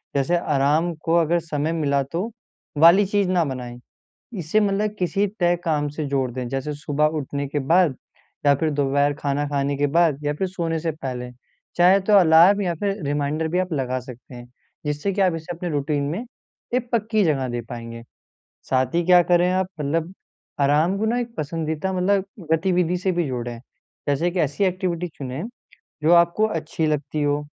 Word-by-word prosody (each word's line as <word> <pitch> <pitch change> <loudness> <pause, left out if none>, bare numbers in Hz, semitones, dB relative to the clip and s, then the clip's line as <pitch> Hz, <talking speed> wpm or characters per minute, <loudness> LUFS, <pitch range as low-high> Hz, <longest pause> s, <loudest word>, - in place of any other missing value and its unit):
जैसे 140 +6 +2
आराम 150 +3 +1
को 165 - +2
अगर 170 0 +3
समय 155 -1 -2
मिला 140 -3 +1
तो 170 - -4 0.5
वाली 170 +6 +7
चीज़ 200 -1 0
ना 180 -2 +2
बनाएँ, 125 -2 -6 0.6
इसे 170 +6 +1
मतलब 210 +1 0
किसी 195 +3 +1
तय 175 -1 +3
काम 150 -3 0
से 150 +1 -4
जोड़ 135 -2 0
दें। 125 0 -4
जैसे 135 +3 -3
सुबह 150 +1 -1
उठने 140 0 -4
के 145 +1 -2
बाद 160 0 +3 0.5
या 140 - +6
फिर 155 +3 0
दोपहर 145 0 +1
खाना 145 0 -2
खाने 140 0 -1
के 145 +1 +2
बाद 160 -2 +2
या 145 - +1
फिर 190 +5 -2
सोने 165 -3 -2
से 165 0 -2
पहले। 125 -4 -6 0.4
चाहे 180 +3 +5
तो 205 +2 0
अलार्म 175 +4 +6
या 175 -3 0
फिर 200 +3 -2
रिमाइंडर 145 +2 -1
भी 180 +3 0
आप 185 -3 -2
लगा 130 -2 -1
सकते 125 0 -12
हैं 120 0 -10 0.4
जिससे 150 +6 -1
कि 195 - 0
आप 185 -3 +3
इसे 165 +2 -6
अपने 175 +1 -4
रूटीन 145 -1 -1
में 215 +9 -4 0.5
एक 250 -1 -1
पक्की 220 -2 +1
जगह 135 -6 +1
दे 120 0 -3
पाएँगे। 115 -1 -7 0.7
साथ 130 +2 +1
ही 175 - +3
क्या 180 -1 +7
करे 175 +1 +3
आप 185 0 +1
मतलब, 165 +5 -1 0.5
आराम 150 +7 +3
को 220 - -1
ना 240 +2 +1
एक 235 -1 -6
पसंदीदा 160 +4 -3
मतलब 190 +1 +1 0.3
गतिविधि 180 +1 +1
से 185 0 0
भी 175 -2 0
जोड़ें। 120 -2 -4 0.5
जैसे 165 +5 +1
कि 185 - -4
ऐसी 150 +6 0
एक्टिविटी 180 -2 -1
चुनें 135 +3 -5 0.6
जो 160 +3 +4
आपको 170 +5 +4
अच्छी 160 -3 -2
लगती 150 0 -1
हो, 145 0 0
160 Hz, 185 wpm, -23 LUFS, 140-180 Hz, 0.7 s, वाली